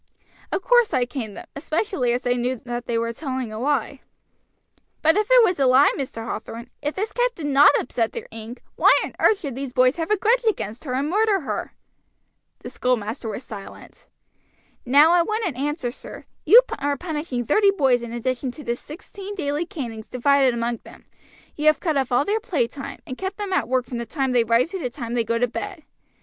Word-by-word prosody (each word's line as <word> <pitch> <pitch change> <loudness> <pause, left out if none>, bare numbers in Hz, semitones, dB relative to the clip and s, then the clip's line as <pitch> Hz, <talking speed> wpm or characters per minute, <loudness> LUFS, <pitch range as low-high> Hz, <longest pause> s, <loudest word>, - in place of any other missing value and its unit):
"Of 380 - -2
course 485 -1 +4
I 250 -1 +2
caned 240 -5 -6
them, - - -8
especially 310 - -1
as 245 +1 -2
I 245 - +3
knew 250 0 -2
that 240 0 -5
they 235 - 0
were 230 0 -1
telling 260 -4 -4
a 215 - -5
lie." 275 0 -1 1.0
"But 320 +2 +5
if 420 0 +1
it - - +7
was 360 -7 +1
a 270 - +4
lie, 260 +3 +6
Mr. 240 -5 -5
Hathorn, 230 +1 -6
if 295 +1 -3
this 420 +2 -3
cat - - 0
did 320 - -6
not 285 0 +6
upset 235 -2 -1
their - - -6
ink, 225 +2 -9
why - - +6
on - - -6
earth 425 - +3
should 280 -5 -4
these 265 0 -6
boys 255 +3 +3
have 325 -1 -3
a 425 - +3
grudge 465 +6 +2
against 225 - -5
her 255 -2 -2
and 275 +3 0
murder 410 +2 +2
her?" 275 - -4 0.9
The - - -7
schoolmaster 230 -1 -2
was 220 +4 -6
silent. 205 -5 -11 0.8
"Now 290 +6 +6
I 350 - +5
want 430 +5 -1
an 330 -9 -2
answer, 280 -1 -2
sir. - - -10 0.2
You 485 +3 +9 0.2
are 285 0 -1
punishing 300 -7 -4
thirty 400 - +4
boys 270 -10 +2
in 235 -1 -7
addition 255 +2 -2
to 300 - -10
the 235 -2 -1
sixteen 385 +9 -9
daily 305 -1 -2
canings 235 - -6
divided 265 0 +3
among 235 0 -1
them; - - -16 0.5
you 305 +1 -1
have 310 - +5
cut 320 -4 -1
off 265 -2 0
all 245 +4 +3
their 425 +2 0
play 335 - 0
time, 275 +3 -8
and 255 - -7
kept 380 +1 -4
them 405 -2 -3
at - - +1
work 255 -1 +1
from 240 -1 -5
the 235 - -5
time 270 0 -1
they 245 -2 +3
rise 230 +8 +2
to 385 - -4
the 250 - -2
time 235 -2 -6
they 240 -1 +1
go 230 +1 -1
to 245 +1 +2
bed. 345 - -6
275 Hz, 215 wpm, -23 LUFS, 240-340 Hz, 1.0 s, You